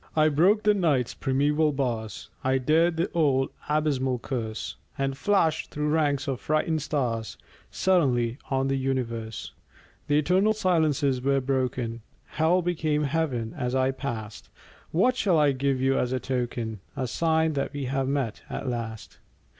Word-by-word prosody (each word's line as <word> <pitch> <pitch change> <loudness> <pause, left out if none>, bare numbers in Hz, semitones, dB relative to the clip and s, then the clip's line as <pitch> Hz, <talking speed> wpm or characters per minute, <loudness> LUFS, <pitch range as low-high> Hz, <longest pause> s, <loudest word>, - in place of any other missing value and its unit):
I 155 0 +5
broke 185 +9 +3
the 210 - +5
Night's 150 - +1
primeval 145 +3 +1
bars, 115 -5 -3
I 130 0 +2
dared 160 +6 +2
the 170 +3 0
old 140 -5 +2 0.2
abysmal 140 -4 +1
curse, 115 -3 -4 0.2
And 135 0 -1
flashed 165 -2 +1
through 150 0 -2
ranks 150 -2 +1
of 135 -3 -2
frightened 155 +1 0
stars 120 -7 -2 0.3
Suddenly 130 -9 +1
on 135 -1 +1
the 135 0 0
universe! 120 -4 -3 0.6
The 145 0 +3
eternal 185 +8 +3
silences 155 -9 +1
were 135 +1 +2
broken; 125 -3 -2 0.2
Hell 170 +3 +1
became 155 -3 0
Heaven 140 -6 -1
as 125 +1 -2
I 130 0 +2
passed. 115 -6 -6 0.4
What 245 +10 +2
shall 195 -9 +2
I 150 -2 +4
give 135 0 0
you 135 +1 +2
as 125 - 0
a 130 - 0
token, 120 -4 -3 0.2
A 130 - -1
sign 160 +4 +1
that 140 -1 -2
we 140 -1 -4
have 135 +1 -1
met, 135 -5 -1
at - - -5
last? 115 -3 -5
135 Hz, 155 wpm, -26 LUFS, 125-155 Hz, 0.6 s, I